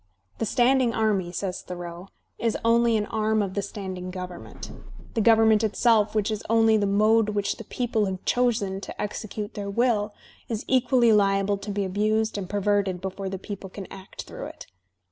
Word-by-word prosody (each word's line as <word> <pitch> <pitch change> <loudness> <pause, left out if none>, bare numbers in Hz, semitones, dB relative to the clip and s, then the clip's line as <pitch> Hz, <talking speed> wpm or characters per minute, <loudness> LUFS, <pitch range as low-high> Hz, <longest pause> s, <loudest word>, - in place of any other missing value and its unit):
"The 225 - 0
standing 250 0 +3
army," 205 -5 +1
says 185 +1 -3
Thoreau, 175 0 -7 0.3
"is 230 -2 0
only 230 0 +4
an 210 - -1
arm 215 0 +1
of 190 -2 -4
the 200 - -1
standing 190 -2 -6
government. 180 -1 -8 0.4
The 225 - +1
government 220 -1 +5
itself, 220 0 +3
which 215 0 +1
is 215 - -2
only 225 -1 +5
the 205 -2 +2
mode 215 +2 +3
which 205 -1 -1
the - - -8
people 225 -2 -1
have 190 -1 -5
chosen 220 -6 +1
to - - -8
execute 210 0 -4
their 205 -2 -5
will, 215 -1 +1 0.3
is 225 -2 -3
equally 250 -3 +4
liable 195 -1 +2
to 200 +1 -7
be 200 -1 -1
abused 215 +3 0
and 185 -2 -6
perverted 200 -2 +1
before 190 +1 -4
the 190 - -4
people 195 0 -7
can 195 +1 -8
act 195 0 -9
through - - -7
it. - - -11
210 Hz, 180 wpm, -25 LUFS, 195-225 Hz, 0.4 s, government